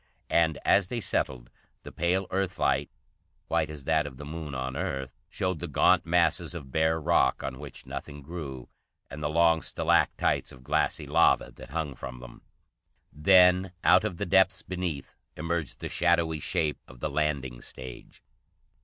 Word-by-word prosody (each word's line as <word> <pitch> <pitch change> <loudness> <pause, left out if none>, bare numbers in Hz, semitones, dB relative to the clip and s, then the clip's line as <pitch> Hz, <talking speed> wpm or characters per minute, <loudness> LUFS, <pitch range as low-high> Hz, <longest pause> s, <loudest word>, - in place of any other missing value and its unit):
And, 80 -2 +3
as 100 -2 +4
they 120 +4 -3
settled, 65 - -2 0.3
the - - -9
pale 90 +3 0
Earth 95 -1 -1
light, - - +1 0.6
white - - +1
as 75 -3 -8
that 80 0 +1
of 65 -3 -10
the 75 - -8
Moon 75 -2 -6
on 65 0 -3
Earth, 70 -6 -3
showed 90 -3 -2
the 85 - -4
gaunt 75 +2 +3
masses 85 0 +2
of 70 -6 -8
bare 80 +2 +2
rock, 75 - +2
on 65 -1 -5
which 75 -2 -10
nothing 70 +1 -7
grew, 70 -5 -7 0.4
and 75 +2 -7
the 75 - -1
long 80 0 +4
stalactites - - +1
of 65 -1 -14
glassy - - 0
lava - - +3
that - - -11
hung 75 -1 -3
from 65 -1 -8
them. - - -12 0.7
Then 90 +3 +5
out - - +6
of 100 -6 -3
the 100 - -2
depths 95 +1 +3
beneath 90 -6 -4 0.2
emerged 85 -1 -3
the - - -3
shadowy 80 -2 +1
shape 75 +1 -1
of 60 - -14
the - - -1
landing 70 -5 -1
stage. 65 -1 -9
80 Hz, 165 wpm, -28 LUFS, 70-85 Hz, 0.7 s, out